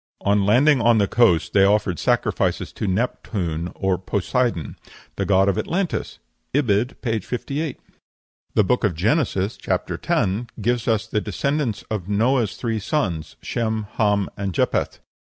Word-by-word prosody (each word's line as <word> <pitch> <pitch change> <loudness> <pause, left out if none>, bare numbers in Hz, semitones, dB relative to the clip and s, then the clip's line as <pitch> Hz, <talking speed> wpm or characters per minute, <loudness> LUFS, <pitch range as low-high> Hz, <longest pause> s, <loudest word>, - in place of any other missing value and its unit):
On 100 0 +2
landing 130 +5 +5
on 115 0 +4
the 100 -2 +3
coast 110 -9 +3
they 100 - +5
offered 100 -4 +2
sacrifices - - 0
to - - -3
Neptune 90 -5 -2
or 95 -2 0
Poseidon" 100 - -1 0.4
the - - -2
god 95 0 +4
of 100 - +1
Atlantis. 180 +1 -2 0.4
(Ibid., 120 -3 +1
p. 115 -3 0
58.) 140 - -4 0.8
The 105 - +5
Book 125 +6 +1
of 100 -6 +1
Genesis 105 - 0
(chap. - - -2
x.) - - 0 0.3
gives 120 +2 0
us 110 -3 +1
the 105 - -1
descendants 135 - -1
of 100 -3 -3
Noah's 115 +1 +1
three 115 -3 -2
sons, 95 - -2
Shem, 110 -2 -1
Ham, 105 -3 +2
and 100 -3 -4
Japheth. - - 0
105 Hz, 145 wpm, -22 LUFS, 95-120 Hz, 0.8 s, landing